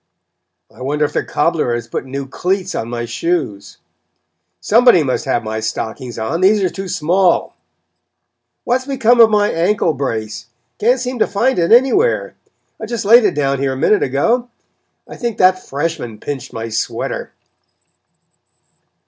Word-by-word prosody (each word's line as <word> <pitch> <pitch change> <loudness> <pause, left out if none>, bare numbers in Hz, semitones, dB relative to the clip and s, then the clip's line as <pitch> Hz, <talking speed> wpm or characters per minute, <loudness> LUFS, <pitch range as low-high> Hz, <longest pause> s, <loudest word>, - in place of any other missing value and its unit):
"I - - -15
wonder 150 +3 0
if - - -5
the - - 0
cobbler 150 -6 0
has 120 -1 -5
put 120 - -4
new 135 +1 -5
cleats 185 +7 -2
on 115 - -4
my 120 0 -4
shoes?" 115 - -3 0.8
"Somebody 230 -6 +4
must 135 +2 -2
have 130 -3 0
my 110 0 -4
stockings 115 +3 -5
on 115 +10 -2
these 200 +2 +4
are 185 - 0
too 195 0 -6
small." 175 +2 +1 1.1
"What 245 +2 +1
has 260 - -13
become 245 -3 +2
of 225 - +7
my 210 -1 +2
ankle 175 0 +1
brace 115 -5 -4 0.3
can't 245 +5 +2
seem 250 0 -4
to - - +3
find 235 +3 0
it 170 - +1
anywhere? 395 - +3 0.5
I 220 - -5
just 235 -2 -4
laid 230 +2 +6
it 195 - +1
down 140 -2 0
here 135 -1 0
a - - -6
minute 210 +10 +2
ago. 230 - 0 0.6
I - - -10
think 235 -3 -3
that 185 0 +3
freshman 140 -6 -4
pinched 135 -2 -6
my 115 0 -5
sweater." 110 0 -3
170 Hz, 160 wpm, -17 LUFS, 130-215 Hz, 1.1 s, of